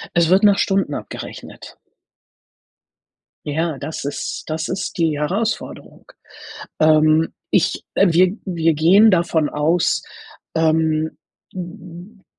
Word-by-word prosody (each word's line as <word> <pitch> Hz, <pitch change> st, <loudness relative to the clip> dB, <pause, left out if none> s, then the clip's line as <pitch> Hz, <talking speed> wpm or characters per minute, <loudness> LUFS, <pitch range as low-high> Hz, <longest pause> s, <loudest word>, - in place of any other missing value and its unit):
Es 170 Hz, -1 st, +3 dB
wird 190 Hz, +3 st, +4 dB
nach 200 Hz, -1 st, +5 dB
Stunden 195 Hz, -8 st, 0 dB
abgerechnet. -, -, -9 dB, 1.7 s
Ja, 155 Hz, 0 st, -2 dB
das 145 Hz, +2 st, -6 dB
ist 140 Hz, -, -4 dB
das 160 Hz, 0 st, -3 dB
ist 190 Hz, +2 st, -4 dB
die 160 Hz, -3 st, +1 dB
Herausforderung. 200 Hz, +9 st, -4 dB, 0.8 s
Ähm, 155 Hz, 0 st, +4 dB, 0.2 s
ich -, -, +1 dB
äh, 195 Hz, -, +4 dB
wir 185 Hz, +4 st, +3 dB
wir 165 Hz, -4 st, 0 dB
gehen 190 Hz, +8 st, +5 dB
davon 170 Hz, -4 st, +1 dB
aus, 160 Hz, +4 st, 0 dB, 0.5 s
ähm, 160 Hz, -1 st, +1 dB, 0.4 s
d 185 Hz, -, -6 dB, 0.6 s
d -, -, -30 dB
165 Hz, 110 wpm, -19 LUFS, 155-185 Hz, 1.7 s, nach